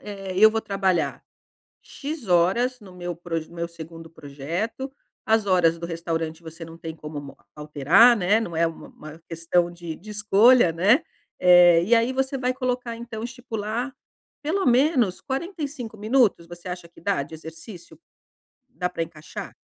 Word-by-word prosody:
eh, 195 -2 -7
eu 215 +2 +9
vou 225 0 -1
trabalhar 195 -4 -1 0.6
X 290 -4 -7
horas 195 +9 +2
no 200 -4 -14
meu 175 -1 -5
proj 165 -2 -4
no 170 - -14
meu 170 0 -3
segundo 165 0 -11
projeto" 165 - -5 0.3
as 220 -1 +2
horas 175 -4 +3
do 170 - -5
restaurante 165 -1 -4
você 165 +1 -9
não 165 0 -12
tem 165 -1 -7
como 150 -1 -7
mo 140 -1 -11 0.2
alterar, 150 - +5
né. 200 +3 +3
Não 175 -8 -5
é 165 +1 +3
uma 165 - -9
uma 155 +1 -12
questão 170 +1 0
de 170 -2 -7
de 210 +7 -14
escolha, 210 +1 +5
né, 200 - +3 0.4
eh, 175 -1 +7
e 220 +7 +2
aí 230 +3 +2
você 265 +1 -1
vai 255 0 0
colocar 250 -2 -3
então, 230 -1 -7
estipular 235 +1 -4 0.5
pelo 340 +7 -1
menos 250 - +3
45 280 - -5
minutos, 215 -5 +2
você 175 +1 -11
acha 180 -1 -6
que 170 - -19
dá 195 -3 0
de 145 - -13
exercício? 165 - -11 0.7
Dá 180 -7 -3
pra 170 -2 -2
encaixar? 155 -2 -9
185 Hz, 165 wpm, -24 LUFS, 165-235 Hz, 0.7 s, eu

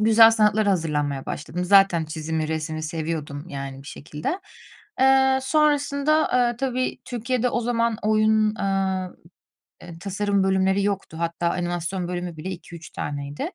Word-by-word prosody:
Güzel 225 +1 +7
sanatlara 215 -1 +3
hazırlanmaya 150 -6 -1
başladım. 175 +4 -4
Zaten 190 -3 +5
çizimi, 155 0 -3
resmi 155 0 -3
seviyordum 155 -1 -4
yani 135 -2 -6
bir 140 - -16
şekilde. 150 - -5 0.6
Eee, 265 0 +5
sonrasında, 295 +1 +2 0.2
eee, 240 - -3
tabii 255 0 -2
Türkiye'de 250 +1 -1
o 240 - -1
zaman 230 -1 0
oyun, 215 0 +3
aaa, 190 -2 -1 0.7
eee, 170 -2 -11
tasarım 200 +1 0
bölümleri 190 +1 +2
yoktu 195 -5 -2
hatta 170 0 -1
animasyon 175 +1 -2
bölümü 175 -2 -4
bile 175 +5 -5
2-3 170 -2 -9
taneydi. 145 0 -5
190 Hz, 135 wpm, -24 LUFS, 160-225 Hz, 0.7 s, Güzel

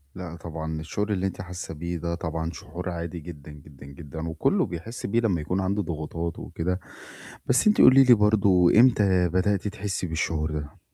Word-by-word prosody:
لأ، 90 -2 -7
طبعًا 80 -1 -5
الشعور 105 +6 -3
اللي 95 0 0
أنتِ 95 - -6
حاسّة 90 -2 -7
بيه 85 +2 -4
ده 85 +1 -3
طبعًا 80 0 -3
شعور 90 +4 -7
عادي 85 0 -5
جدًا، 75 -2 -10
جدًا، 70 -2 -14
جدًا 75 +3 -8
وكلّه 80 - +1
بيحس 90 +8 -7
بيه 115 +4 +1
لمّا 95 -9 +1
يكون 90 +5 -1
عنده 100 +2 0
ضغوطات 85 0 -4
وكده، 90 +3 -3 0.7
بس 125 - +3
أنتِ 210 - +5
قولي 135 +1 +8
لي 125 -1 +7
برضه 100 -4 +4
إمتى 100 -8 +4
بدأتِ 95 +3 0
تحسّي 100 -3 -3
بالشعور 80 -1 -2
ده؟ 75 -1 -6
85 Hz, 175 wpm, -25 LUFS, 80-100 Hz, 0.7 s, قولي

